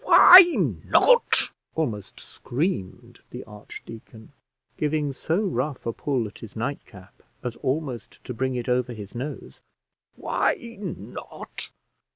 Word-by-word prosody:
"Why 365 -5 +10 0.5
not!" - - +4 0.2
almost 110 -11 -3
screamed 120 - -4
the 125 - -8
archdeacon, 110 +2 -12 0.4
giving 150 -2 -1
so 165 +8 -1
rough 145 - -3
a 115 - -2
pull 130 -3 -1
at 105 - -13
his 110 - -11
nightcap 110 -6 -7 0.2
as 120 -2 -4
almost 135 -3 -4
to 125 - -6
bring 130 +2 -2
it 120 -1 -4
over 125 0 0
his 105 -3 -10
nose; 130 +5 -7 0.6
"why - - 0 0.2
not! 195 -4 -8
125 Hz, 120 wpm, -24 LUFS, 115-150 Hz, 0.6 s, Why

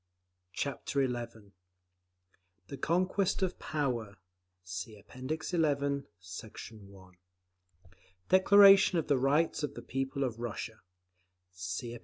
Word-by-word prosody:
Chapter 140 +2 -1
XI 115 -4 -6 1.2
The 140 - -6
Conquest 185 +3 +1
of 185 -1 -2
Power 120 -9 -2 0.5
(See 95 +4 -6
App. 100 +1 -20
XI, 140 0 -1 0.2
Sect. 95 +5 -9
1) 100 -4 -15 1.2
DECLARATION 195 0 +7
OF 165 - -1
THE 145 - +3
RIGHTS 145 +6 +2
OF 145 -2 -3
THE - - -8
PEOPLES 135 +1 -2
OF 115 -3 -4
RUSSIA 115 -1 -5 0.7
(See 95 +6 -5
App. 120 - -8
135 Hz, 110 wpm, -31 LUFS, 110-155 Hz, 1.2 s, DECLARATION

